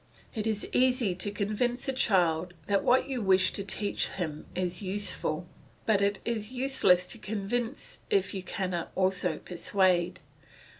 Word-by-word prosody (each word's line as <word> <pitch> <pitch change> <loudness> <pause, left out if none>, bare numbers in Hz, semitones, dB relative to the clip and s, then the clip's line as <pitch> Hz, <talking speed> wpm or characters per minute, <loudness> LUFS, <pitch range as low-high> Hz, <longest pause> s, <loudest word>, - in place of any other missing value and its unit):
It 220 -2 -2
is 215 -2 -1
easy 250 -5 +3
to 185 +3 -3
convince 215 +5 -1
a 270 - 0
child 175 -8 +2
that 200 -1 +1
what 255 +2 +4
you 260 -3 -2
wish 190 -2 +4
to 200 - -1
teach 200 +1 -1
him 155 -5 -5
is 180 -1 -1
useful, 185 -4 -1 0.4
but 210 -3 +3
it 200 0 +2
is 225 -1 -2
useless 250 -9 +3
to 230 - -8
convince 220 +5 -3
if 405 - +2
you 190 - -3
cannot 185 -2 -3
also 185 -3 +1
persuade. 180 0 +1
200 Hz, 150 wpm, -29 LUFS, 180-230 Hz, 0.4 s, what